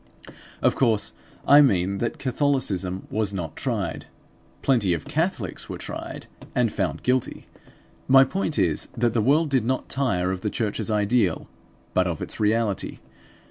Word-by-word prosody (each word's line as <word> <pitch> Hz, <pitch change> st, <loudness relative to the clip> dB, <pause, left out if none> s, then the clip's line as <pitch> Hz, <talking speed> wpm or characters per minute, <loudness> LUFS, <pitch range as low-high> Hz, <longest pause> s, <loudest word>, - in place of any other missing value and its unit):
Of -, -, +3 dB
course, 115 Hz, -5 st, +2 dB, 0.3 s
I 145 Hz, +1 st, +8 dB
mean 100 Hz, -7 st, +2 dB
that 120 Hz, -, -2 dB
Catholicism 120 Hz, -9 st, 0 dB
was 105 Hz, -2 st, -1 dB
not 80 Hz, -4 st, -5 dB
tried; -, -, -3 dB, 0.6 s
plenty 110 Hz, -10 st, +2 dB
of 80 Hz, -, -7 dB
Catholics 160 Hz, -, -2 dB
were -, -, -5 dB
tried, -, -, -7 dB, 0.3 s
and 120 Hz, -4 st, +2 dB
found 90 Hz, -8 st, -2 dB
guilty. 125 Hz, 0 st, -1 dB, 0.6 s
My 135 Hz, 0 st, +8 dB
point 160 Hz, +1 st, -2 dB
is 85 Hz, -7 st, +1 dB
that 120 Hz, -1 st, +1 dB
the 115 Hz, -, +2 dB
world 145 Hz, +6 st, +3 dB
did 130 Hz, -4 st, +2 dB
not 130 Hz, +3 st, -2 dB
tire 95 Hz, -10 st, 0 dB
of 95 Hz, -1 st, -4 dB
the 105 Hz, -, -1 dB
church's 110 Hz, +1 st, -2 dB
ideal, 105 Hz, -3 st, +1 dB, 0.5 s
but 90 Hz, 0 st, +2 dB
of 85 Hz, -3 st, -3 dB
its -, -, -5 dB
reality. 110 Hz, -2 st, 0 dB
110 Hz, 150 wpm, -24 LUFS, 95-130 Hz, 0.6 s, I